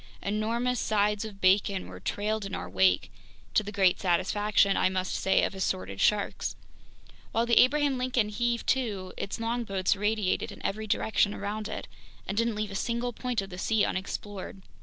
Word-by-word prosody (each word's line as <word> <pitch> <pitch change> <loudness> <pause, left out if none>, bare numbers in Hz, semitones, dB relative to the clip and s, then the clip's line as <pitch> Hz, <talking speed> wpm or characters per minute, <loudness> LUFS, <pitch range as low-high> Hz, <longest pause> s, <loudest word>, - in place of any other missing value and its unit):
Enormous 230 +4 0
sides 210 0 +1
of 205 -2 -9
bacon 190 0 +3
were - - -9
trailed 215 +1 -2
in 195 -1 -4
our 90 - -5
wake, 95 0 +2 0.4
to - - +4
the 205 0 -6
great 190 -3 +3
satisfaction, 195 +2 +2
I - - +3
must 185 -1 -2
say, 190 - +2
of - - 0
assorted 185 - -2
sharks. 210 -1 +1 0.8
While 230 +1 +1
the 235 0 +5
Abraham 280 0 +3
Lincoln 250 -4 +1
heaved 235 +2 -1
to, 205 -8 -1
its 200 - -4
longboats 225 -5 0
radiated 210 -1 0
in - - -11
every 215 +2 -2
direction 205 0 +1
around 210 +1 -4
it - - -6 0.4
and 195 - -3
didn't 230 0 +1
leave 210 -1 -3
a - - -6
single 235 +3 -1
point 245 -2 -2
of 195 - -10
the 180 - -7
sea 220 +1 +2
unexplored. 190 0 -5
210 Hz, 175 wpm, -28 LUFS, 195-230 Hz, 0.8 s, the